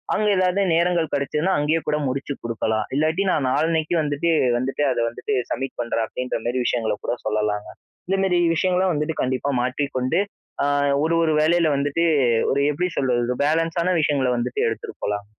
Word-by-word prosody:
அங்க 215 - +1
எதாவது 185 +1 +2
நேரங்கள் 170 -1 +1
கிடைச்சுதுனா, 150 +6 0
அங்கேயே 155 +3 +1
கூட 150 0 +1
முடிச்சு 140 +2 -3
குடுக்கலாம். 110 -2 -1
இல்லாட்டி 160 +6 +1
நான் 140 -6 +1
நாளன்னைக்கி 160 +3 +1
வந்துட்டு, 150 +3 0 0.3
வந்துட்டு 135 +4 -1
அத - - -1
வந்துட்டு 125 +4 -3 0.2
சப்மிட் 135 0 -3
பண்றேன், 115 -1 -1
அப்பிடின்றமாரி 125 0 -3
விஷயங்கள 115 -4 0
கூட - - 0
சொல்லலாங்க. 105 -1 -1 0.4
இந்தமேரி 190 -1 +1 0.2
விஷயங்களும் 185 +2 +1
வந்துட்டு 150 +1 -1
கண்டிப்பா 130 +2 -1
மாற்றிக்கொண்டு 130 +2 -1 0.4
அ - - +2 0.4
ஒரு, 165 +1 +1
ஒரு 160 -1 +2
வேலையில 165 +1 +3
வந்துட்டு 145 +4 0 0.5
ஒரு 140 - +1
எப்பிடி 150 +5 0
சொல்வது? 125 -3 +1
ஒரு 125 - -1
பேலன்ஸான 165 +3 +1
விஷயங்கள 140 -4 +1
வந்துட்டு 120 +1 -2
எடுத்துட்டு 115 - -5
போலாம். 105 0 -2
145 Hz, 155 wpm, -22 LUFS, 125-165 Hz, 0.5 s, வேலையில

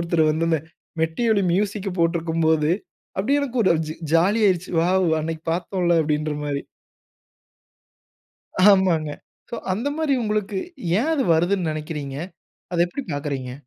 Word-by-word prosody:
ஒருத்தரு 170 -1 +1
வந்து, 160 +2 0
இந்த 160 - +3 0.4
மெட்டி 165 +9 -1
ஒலி 200 -2 +2
மியூசிக்க 200 0 -1
போட்டுருக்கும் 165 -1 +1
போது, 155 -1 +3 0.5
அப்படியே 275 +10 +2
எனக்கு 255 -3 -1
ஒரு - - +5 0.2
ஜ - - -2 0.2
ஜாலி 195 +7 +3
ஆயிருச்சு. 185 -1 -1
வாவ்! 185 +1 +2
அன்னைக்கு 160 0 -4
பார்த்தோம்ல 175 -1 +1
அப்படீன்ற 150 0 -1
மாரி. 140 -1 -2 2.1
ஆமாங்க. 180 -6 +2 0.4
சோ, - - -4 0.2
அந்த 225 +9 -2
மாரி 315 -3 +1
உங்களுக்கு 210 -2 -1 0.4
ஏன் 310 +7 +1
அது 280 - +1
வருதுன்னு 175 +1 +1
நினைக்கிறீங்க? 150 -3 -5 0.6
அதை 170 - 0
எப்பிடி 265 +10 -6
பார்க்குறீங்க? 140 -3 -3
170 Hz, 135 wpm, -23 LUFS, 160-200 Hz, 2.1 s, ஒரு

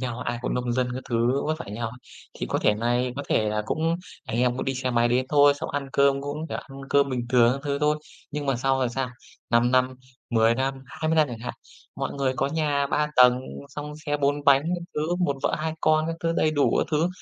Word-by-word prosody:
nhau 125 -2 -3
á, - - -2
ai 120 - -4
cũng - - -1
nông 125 -1 -1
dân 125 0 0
các 130 - -4
thứ 120 +3 +1
vất 155 +1 -1
vả - - -6
như 100 - -6
nhau 115 0 -3
á. 120 - -11 0.4
Thì - - -2
có - - -1
thể 105 - +3
này 120 +3 0
có 145 - -3
thể 110 - +2
là 105 0 -1
cũng 165 +2 0 0.3
anh - - -4
em 125 0 +2
cũng - - -3
đi 135 - -1
xe 130 0 -2
máy 120 0 +3
đến 125 +2 +1
thôi, 145 -1 +5
xong 150 +3 -5
ăn 140 -1 -3
cơm 140 0 +3
cũng, 145 +3 -4
kiểu, - - -3
ăn 135 0 -10
cơm 140 0 +4
bình 125 -2 -2
thường 120 -1 +5
các 135 - -4
thứ 140 -1 -1
thôi. 150 +1 +2 0.3
Nhưng 150 -1 -4
mà 135 -3 +1
sau 135 +2 +1
rồi 130 - +1
sao? 130 +2 -2 0.4
5 120 +1 +4
năm, 130 0 +2 0.4
10 115 -1 +4
năm, 135 +2 -1
20 155 +3 -2
năm 155 -3 +4
chẳng 120 - -6
hạn, 120 +2 -5 0.4
mọi - - -3
người 135 -2 0
có - - +1
nhà 145 -1 0
3 150 +2 +1
tầng, 125 0 +6 0.3
xong 150 +1 -7
xe 145 - +1
4 145 0 0
bánh 140 -1 +6
các 175 +2 -2
thứ, 155 +3 0
1 175 -6 0
vợ - - +1
2 160 +1 -2
con 155 0 +3
các 165 - -2
thứ, 165 0 0
đầy 155 -1 +2
đủ 145 -2 +2
các - - +2
thứ. 160 +2 +2
135 Hz, 265 wpm, -25 LUFS, 125-150 Hz, 0.4 s, tầng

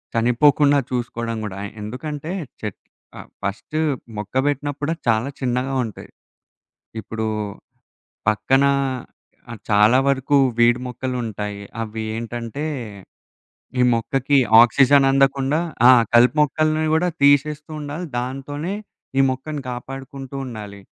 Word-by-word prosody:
చనిపోకుండా 140 +5 +4
చూసుకోవడం 115 -2 -3
గూడా. 100 -1 -6 0.2
ఎందుకంటే 145 +8 -5 0.3
చెట్ 105 -3 -6 0.4
ఆహ్, - - -11
ఫస్ట్ 100 +9 -4 0.4
మొక్క 105 +4 -7
పెట్టినప్పుడే 145 +2 -2
చాలా 115 +4 +2
చిన్నగా 130 +1 -1
ఉంటాయి. 110 - -10 0.9
ఇప్పుడు 110 +2 -4 1.0
పక్కనా 135 +6 +3 0.8
ఆహ్, 115 -3 -8
చాలా 105 +5 +5
వరకు 140 +1 +2 0.2
వీడ్ 120 +1 +4
మొక్కలుంటాయి. 115 -5 -4 0.2
అవి 110 0 -5
ఏంటంటే, 120 +5 -5 1.1
ఈ - - +5
మొక్కకి 135 +4 +1 0.2
ఆక్సిజన్ 135 +3 +5
అందకుండా 135 +1 +2 0.3
ఆ! - - +9 0.2
కలుపు 120 +3 +6
మొక్కల్ని 155 +2 +1
గూడా 180 +2 +2
తీసేస్తూ 150 +2 +3
ఉండాలి. 150 +5 -5
దాంతోనే 140 +7 -4 0.5
ఈ - - +7
మొక్కని 140 +3 -4
కాపాడుకుంటూ 135 +2 -8
ఉండాలి. 105 -4 -8
130 Hz, 105 wpm, -21 LUFS, 115-145 Hz, 1.1 s, ఆ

